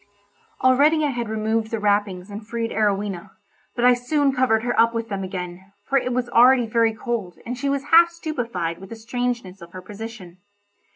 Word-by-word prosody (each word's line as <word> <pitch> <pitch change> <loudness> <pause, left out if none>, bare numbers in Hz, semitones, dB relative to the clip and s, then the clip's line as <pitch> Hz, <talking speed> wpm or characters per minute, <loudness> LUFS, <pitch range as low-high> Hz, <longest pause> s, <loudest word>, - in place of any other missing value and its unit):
Already 295 +5 +4
I 290 - 0
had 240 -3 -4
removed 220 0 -1
the 225 - -2
wrappings 205 -2 0
and 205 +2 -7
freed 230 0 -3
Arowhena; 200 -4 -1 0.4
but 245 - +1
I 250 - +7
soon 275 +3 +1
covered 250 -4 +2
her 245 0 0
up 230 0 +4
with 230 0 -3
them 195 -2 -3
again, 185 0 -7 0.2
for 275 - +3
it 250 - -3
was 245 0 -1
already 245 +1 +5
very 225 0 +1
cold, 220 -6 -4
and 245 - -4
she 275 +3 -2
was 275 -1 -1
half 340 +1 +8
stupefied 235 - -4
with 195 0 -11
the 230 - -7
strangeness 230 -4 -4
of 170 +1 -12
her 185 - -8
position. 205 -4 -9
230 Hz, 190 wpm, -22 LUFS, 200-250 Hz, 0.4 s, half